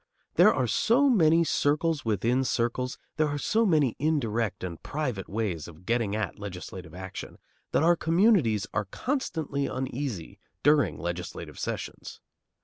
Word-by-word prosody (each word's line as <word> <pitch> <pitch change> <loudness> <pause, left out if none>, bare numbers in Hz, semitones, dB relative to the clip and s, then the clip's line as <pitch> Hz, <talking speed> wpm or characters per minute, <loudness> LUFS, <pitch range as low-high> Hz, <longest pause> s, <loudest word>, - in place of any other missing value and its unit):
There - - +7
are - - +1
so 265 +5 +3
many 165 -6 +5
circles 155 0 +1
within 115 +4 +1
circles, 125 +1 -1 0.2
there 155 -1 +3
are 145 0 -2
so 220 +9 +2
many 150 - +3
indirect 120 - 0
and 85 -3 -5
private 130 -10 -3
ways 100 -7 -2
of 85 +1 -14
getting 115 -3 0
at 110 -4 -3
legislative 90 -4 -8
action, 95 0 -7 0.3
that - - +2
our 170 +1 +5
communities 165 - +3
are 105 - 0
constantly 155 - -2
uneasy 130 - -4 0.2
during 140 - +4
legislative 85 +2 -5
sessions. - - -5
125 Hz, 140 wpm, -28 LUFS, 100-155 Hz, 0.3 s, There